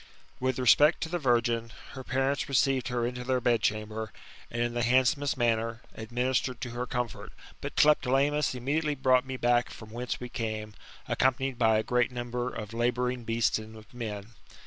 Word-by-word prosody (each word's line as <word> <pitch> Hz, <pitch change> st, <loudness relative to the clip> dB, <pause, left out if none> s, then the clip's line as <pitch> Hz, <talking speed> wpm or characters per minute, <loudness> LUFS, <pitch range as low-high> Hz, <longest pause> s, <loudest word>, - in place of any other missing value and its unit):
With 130 Hz, -1 st, 0 dB
respect 145 Hz, +5 st, +5 dB
to 160 Hz, -, -2 dB
the 175 Hz, +1 st, -1 dB
virgm, 120 Hz, -3 st, +1 dB, 0.2 s
her 130 Hz, -, -8 dB
parents 135 Hz, +2 st, 0 dB
teceived 135 Hz, -1 st, +2 dB
her 120 Hz, -2 st, -1 dB
into 125 Hz, +1 st, -4 dB
their 130 Hz, 0 st, +1 dB
bedchamber, 110 Hz, -2 st, 0 dB, 0.4 s
and, 115 Hz, -, -5 dB
in 120 Hz, 0 st, -2 dB
the 120 Hz, -, -1 dB
handsomest 130 Hz, +4 st, +2 dB
manner, 115 Hz, -1 st, 0 dB
administered 125 Hz, +2 st, -1 dB
to 125 Hz, -, -4 dB
her 120 Hz, +1 st, -4 dB
comfort; 125 Hz, -3 st, -4 dB, 0.3 s
but -, -, -5 dB
Tlepolemus 145 Hz, -1 st, +3 dB
immedi 140 Hz, +6 st, 0 dB
Sitely 150 Hz, -2 st, -1 dB
brought 130 Hz, 0 st, +3 dB
me 130 Hz, 0 st, -4 dB
back 120 Hz, 0 st, +2 dB
from 110 Hz, -1 st, -11 dB
whence 120 Hz, +1 st, -4 dB
we 125 Hz, -, -5 dB
came, 110 Hz, -3 st, -4 dB, 0.3 s
accompanied 130 Hz, -1 st, +1 dB
by 110 Hz, -2 st, +4 dB
a 110 Hz, -, +1 dB
great 125 Hz, +1 st, +1 dB
number 120 Hz, 0 st, -3 dB
of 105 Hz, 0 st, -7 dB
labouring 125 Hz, +1 st, 0 dB
beasts 115 Hz, -1 st, +1 dB
and 110 Hz, 0 st, -10 dB
of 110 Hz, 0 st, -15 dB
men. 110 Hz, -3 st, -6 dB
125 Hz, 175 wpm, -29 LUFS, 115-130 Hz, 0.4 s, respect